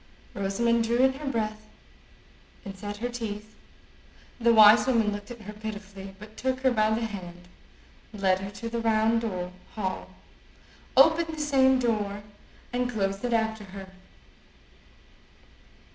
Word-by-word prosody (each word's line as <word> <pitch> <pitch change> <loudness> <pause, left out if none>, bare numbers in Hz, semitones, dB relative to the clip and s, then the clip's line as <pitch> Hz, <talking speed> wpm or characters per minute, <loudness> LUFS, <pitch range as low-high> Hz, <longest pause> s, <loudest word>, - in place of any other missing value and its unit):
Rosamond 230 +4 +1
drew 235 +1 +1
in 265 +1 +4
her 285 +2 -7
breath, 215 -2 -3 1.0
and 195 -1 -7
set 205 +2 -6
her 240 +3 -2
teeth. 215 -3 -6 0.9
The 235 0 +4
wise 220 +2 +8
woman 230 -5 +2
looked 205 0 -7
at 240 -2 -9
her 210 -1 -8
pitifully, 205 -2 -8
but 210 +2 -13
took 260 0 -1
her 260 -1 +3
by 215 -2 +2
the 225 +1 0
hand, 180 -4 -8 0.6
led 190 -3 +1
her 195 +1 -5
to 205 +3 -7
the 230 0 -3
round 225 0 +2 0.5
hall, 190 -4 -3 0.9
opened 320 +3 +5
the - - -8
same 265 -3 +4
door, 210 -4 -1 0.5
and 245 0 0
closed 195 -3 -2
it 245 -1 0
after 220 -1 0
her. 190 0 -10
220 Hz, 140 wpm, -27 LUFS, 205-240 Hz, 1.0 s, wise